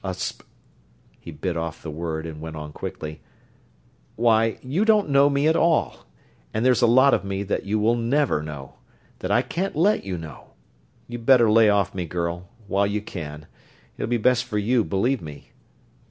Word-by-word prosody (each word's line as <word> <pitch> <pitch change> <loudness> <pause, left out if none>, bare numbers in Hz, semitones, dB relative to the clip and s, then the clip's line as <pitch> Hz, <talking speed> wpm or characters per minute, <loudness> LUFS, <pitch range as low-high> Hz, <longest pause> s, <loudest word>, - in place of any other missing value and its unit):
A 95 -2 -3
sp...." - - -4 0.8
He - - -11
bit 85 +3 -4
off 80 -1 -5
the 80 - -5
word 80 0 -4
and 80 -2 -8
went 80 0 -7
on 75 -1 -8
quickly: 75 -1 -7 0.9
"Why, 115 -1 +2
you 145 +11 0
don't 215 -5 +3
know 140 +1 +5
me 140 +1 +1
at 160 - +3
all, 165 -1 +1 0.5
and 110 +3 0
there's 130 0 +4
a 120 - +5
lot 130 +4 +5
of - - +1
me 100 0 -3
that 100 0 -3
you 105 +2 +1 0.2
never 125 - +1
will - - -4
know 70 -3 -8 0.5
that - - -4
I - - +3
can't 190 +3 -3
let 195 +8 +2
you 95 -2 -4
know! 80 -3 -11 0.5
You'd 120 -1 -8
better 120 -5 +6
lay 110 -1 +6
off 100 -1 +1
me, 90 -3 -4
girl, 85 +1 -4 0.2
while 100 0 +1
you 105 +1 -1
can. 75 -6 -7 0.5
It'll - - -4
be 120 - +2
best 125 +3 +2
for 115 -3 -3
you, 115 +3 +2
believe 120 +8 0
me." 75 -3 -11
105 Hz, 190 wpm, -23 LUFS, 85-125 Hz, 0.9 s, better